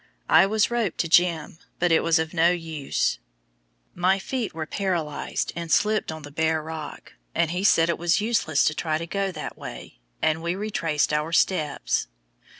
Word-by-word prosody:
I 195 - +6
was 215 +2 +1
roped 230 -7 -1
to 170 - -3
"Jim," 165 -2 +2 0.2
but 175 0 +1
it 165 - +5
was 165 0 +3
of 160 0 -2
no 165 +1 +4
use; 160 - -1 0.7
my 185 +2 +2
feet 235 +4 -3
were 160 -1 -5
paralyzed 170 -5 -2
and 170 -1 -5
slipped 215 -4 +2
on 160 -1 -8
the 145 - -10
bare 160 +1 0
rock, 155 -2 -8 0.2
and 165 -1 +1
he 180 +2 -2
said 165 -5 +5
it 170 - -1
was 170 +1 +2
useless 210 -9 +1
to 155 - +2
try 155 0 -1
to 165 - -5
go 195 +2 -2
that - - -7
way, - - -9 0.2
and 160 +1 +1
we 170 +2 -1
retraced 165 -8 -1
our 150 +2 0
steps. 155 - +1
165 Hz, 180 wpm, -25 LUFS, 160-190 Hz, 0.7 s, I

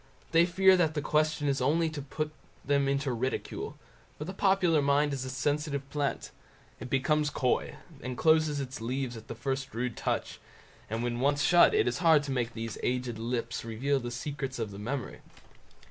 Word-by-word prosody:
They 165 +1 +5
fear 190 +1 +5
that 160 -3 +2
the 150 - 0
question 155 -1 +1
is 140 -1 +1
only 160 +6 +2
put 160 - -5 0.2
to 155 - -1
turn 155 - -8 0.3
them 140 0 +2
into 140 -1 0
ridicule; 125 +2 -3 0.4
for 150 - -5
the 185 - -5
popular 190 -5 +3
mind 140 +1 +2
is 130 -1 -3
a - - -4
sensitive 145 +1 -1
plant; 145 -2 -2 0.5
it 125 - -7
becomes 150 +3 +2
coy, 130 -4 0 0.3
and 125 0 -5
closes 155 -2 +3
its 130 -3 -5
leaves 125 +1 -2
at 110 -1 -10
the - - -6
first 135 +1 -3
rude 125 0 -2
touch; - - -2 0.5
and 115 +2 -2
when 120 0 -2
once 145 +2 +2
shut, 175 - +6
it 425 - +3
is - - -1
hard 160 -4 +5
to 145 - -4
make 125 -2 -1
these 115 -1 -5
aged 125 -2 -2
lips 115 0 -3
reveal 130 +5 0
the 120 -1 -5
secrets 135 +2 -4
of 110 -3 -3
the 100 - -8
memory. 125 +5 -4
140 Hz, 190 wpm, -30 LUFS, 125-150 Hz, 0.5 s, shut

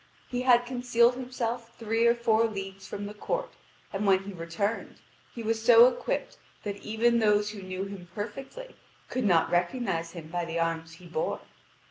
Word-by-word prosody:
He 245 0 -1
had 245 -1 +5
concealed 245 -1 +3
himself 240 -2 -4
three 225 +1 +2
or 235 - +5
four 230 -1 +3
leagues 195 -3 -5
from 205 - -5
the 205 - -6
court, - - -3 0.4
and 200 +1 -1
when 190 0 +4
he 200 0 -7
returned 175 +6 -3 0.4
he 235 - -5
was 225 0 -1
so 235 0 +9
equipped 255 - -2 0.2
that 205 -1 -3
even 230 +3 +2
those 210 -1 +3
who 210 -2 -8
knew 185 0 -4
him 195 -3 -8
perfectly 270 - -6 0.3
could 255 -3 -1
not 175 -5 +3
recognise 175 -2 0
him 165 -3 -9
by 175 +1 -2
the 170 0 -3
arms 165 -1 -1
he 175 +2 -14
bore. 165 -2 -2
210 Hz, 175 wpm, -28 LUFS, 185-235 Hz, 0.4 s, so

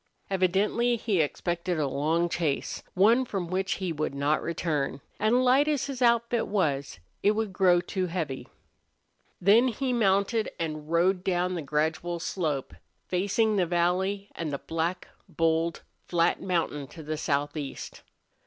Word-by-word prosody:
Evidently 195 +6 +2
he 210 -6 +1
expected 170 +3 -2
a 150 -2 +1
long 155 +5 +1
chase, 160 -5 -2
one 225 +7 +5
from 195 -8 -3
which 190 +2 -1
he 185 -3 -3
would 155 -2 -2
not 145 +2 +1
return, 150 -5 -2 0.2
and 240 +4 +3
light 265 +4 +4
as 295 -3 +1
his 270 -2 -6
outfit 235 -1 +2
was 140 - -1 0.2
it 205 - +4
would 215 -2 -2
grow 180 -2 +4
too 185 +1 -2
heavy. 160 -7 -4 0.9
Then 215 +7 +5
he 255 +2 -1
mounted 210 0 +2
and 155 -2 -4
rode 180 +2 +2
down 180 -1 0
the 175 - -3
gradual 160 +4 -1
slope, 155 -6 -2 0.4
facing 205 +4 +1
the 180 -3 +2
valley 185 +4 0
and 160 -3 -4
the 140 - -2
black, 165 +5 -3 0.2
bold, 165 0 0 0.2
flat 170 -1 +2
mountain 165 -6 -1
to 160 +3 -11
the 155 +1 -3
southeast. 145 -1 -3
180 Hz, 145 wpm, -27 LUFS, 160-205 Hz, 0.9 s, one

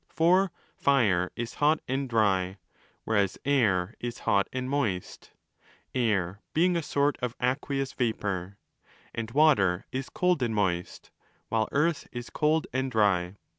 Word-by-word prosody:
For 180 +3 +3 0.2
Fire 105 -11 +2
is 120 0 -4
hot 150 +2 +4
and 135 +1 -2
dry, 95 -4 +1 0.5
whereas 100 -3 +1
Air 110 -9 +2
is 120 -1 -4
hot 100 -1 +3
and 130 0 -3
moist 120 -10 -2 0.6
5(Air 100 -6 0 0.2
being 175 +3 +3
a 170 - +1
sort 145 -1 0
of 125 -1 -2
aqueous 135 +1 -1
vapour); 100 -5 -2 0.6
and 115 -1 -4
Water 115 - +3
is 130 +1 -4
cold 180 -7 +1
and 115 -3 0
moist, 90 -4 -2 0.4
while 110 -1 0
Earth 155 +2 +1
is 120 0 -7
cold 155 +1 +1
and 130 +1 0
dry. 100 -6 +1
120 Hz, 135 wpm, -28 LUFS, 100-140 Hz, 0.6 s, hot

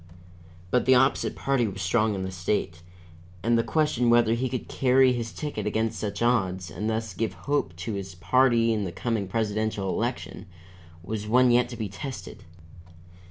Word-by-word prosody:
But 125 - +2
the 130 - +7
opposite 135 +2 +2
party 135 -4 +1
was 100 -1 -6
strong 110 +2 +1
in 95 - -3
the 95 - -4
state, 85 -2 -2 0.6
and 115 +1 +3
the 115 - +4
question 150 -6 +1
whether 120 -1 +4
he 125 +2 -1
could 125 - -4
carry 130 0 +3
his 115 -2 -4
ticket 150 -4 -4
against 110 +1 -1
such 105 +1 -3
odds, 95 -6 0
and 105 +6 -3
thus 110 -2 -2
give 110 0 -2
hope 140 - 0
to 95 +6 -5
his 95 -2 -6
party 115 +5 +3
in 105 -2 -1
the 90 - -3
coming 100 +3 -2
presidential 110 -1 -1
election, 95 - -3 0.6
was 105 +3 -4
one 125 +2 +4
yet 120 0 +3
to 120 - -7
be 110 -2 -3
tested. 120 +8 -8
110 Hz, 175 wpm, -26 LUFS, 100-125 Hz, 0.6 s, the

